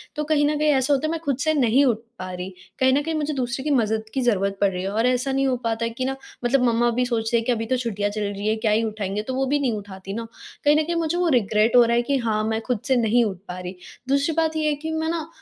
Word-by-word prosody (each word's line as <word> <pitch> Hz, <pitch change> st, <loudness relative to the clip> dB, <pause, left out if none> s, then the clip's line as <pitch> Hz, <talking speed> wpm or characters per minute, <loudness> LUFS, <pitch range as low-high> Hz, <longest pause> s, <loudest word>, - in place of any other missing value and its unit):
तो 300 Hz, -, -1 dB
कहीं 295 Hz, -1 st, +2 dB
न 300 Hz, -, 0 dB
कहीं 305 Hz, +1 st, +2 dB
ऐसा 270 Hz, +2 st, +2 dB
होता 280 Hz, +3 st, +1 dB
है 315 Hz, -, -1 dB
मैं 330 Hz, -, -2 dB
खुद 275 Hz, -3 st, 0 dB
से 315 Hz, +2 st, +1 dB
नहीं 265 Hz, 0 st, +3 dB
उठ 240 Hz, -5 st, +2 dB, 0.2 s
पा 185 Hz, 0 st, -5 dB
रही 180 Hz, +1 st, -5 dB, 0.3 s
कहीं 260 Hz, -1 st, +4 dB
न 285 Hz, -, +3 dB
कहीं 325 Hz, -, -2 dB
मुझे 300 Hz, 0 st, -1 dB
दूसरे 250 Hz, -1 st, -2 dB
की 300 Hz, -, -1 dB
मदद 220 Hz, -4 st, +1 dB
की 265 Hz, -, 0 dB
ज़रूरत 200 Hz, -4 st, +1 dB
पड़ 200 Hz, -, +4 dB
रही 180 Hz, 0 st, -4 dB
है 195 Hz, -, -2 dB
और 225 Hz, +4 st, 0 dB
ऐसा 250 Hz, +2 st, +1 dB
नहीं 270 Hz, 0 st, +1 dB
हो 255 Hz, -, +1 dB
पाता 230 Hz, 0 st, -1 dB
है 230 Hz, -, -1 dB
कि 255 Hz, +3 st, -3 dB
ना 270 Hz, 0 st, -1 dB, 0.3 s
मतलब 255 Hz, +1 st, +3 dB
मम्मा 240 Hz, 0 st, +3 dB
भी 250 Hz, -, +3 dB
सोचते 235 Hz, -1 st, 0 dB
हैं 230 Hz, -, -2 dB
कि -, -, +1 dB
अभी 225 Hz, -1 st, -1 dB
तो 255 Hz, +2 st, 0 dB
छुट्टियाँ 205 Hz, -4 st, -2 dB
चल 210 Hz, +1 st, -4 dB
रही 205 Hz, 0 st, -3 dB
है, 220 Hz, -, +2 dB
क्या 220 Hz, -1 st, 0 dB
ही 220 Hz, +2 st, +2 dB
उठाएँगे, 210 Hz, -2 st, -3 dB
तो 260 Hz, +4 st, -5 dB
वो 270 Hz, +1 st, +1 dB
भी 290 Hz, +2 st, +1 dB
नहीं 255 Hz, -5 st, 0 dB
उठाती 195 Hz, -1 st, -8 dB
ना 230 Hz, +1 st, -5 dB, 0.4 s
कहीं 295 Hz, -, +6 dB
न 310 Hz, -, +3 dB
कहीं 340 Hz, +2 st, -2 dB
मुझे 335 Hz, +1 st, 0 dB
वो 355 Hz, -1 st, +1 dB
रिग्रेट 220 Hz, 0 st, +2 dB
हो 245 Hz, -, +8 dB
रहा 235 Hz, 0 st, +2 dB
है 240 Hz, -, +3 dB
कि 275 Hz, +3 st, 0 dB
हाँ 220 Hz, -3 st, 0 dB
मैं 220 Hz, +1 st, -1 dB
खुद 245 Hz, -1 st, -2 dB
से 260 Hz, -, +3 dB
नहीं 235 Hz, 0 st, +3 dB
उठ 195 Hz, -4 st, -3 dB
पा 180 Hz, +1 st, -6 dB
रही। 180 Hz, +1 st, -6 dB, 0.3 s
दूसरी 280 Hz, +3 st, +2 dB
बात 320 Hz, -1 st, +1 dB
ये 310 Hz, -1 st, +1 dB
है 295 Hz, -, 0 dB
कि 315 Hz, +2 st, -5 dB
मैं 320 Hz, 0 st, -1 dB
ना 325 Hz, -2 st, -2 dB
245 Hz, 310 wpm, -23 LUFS, 220-285 Hz, 0.4 s, हो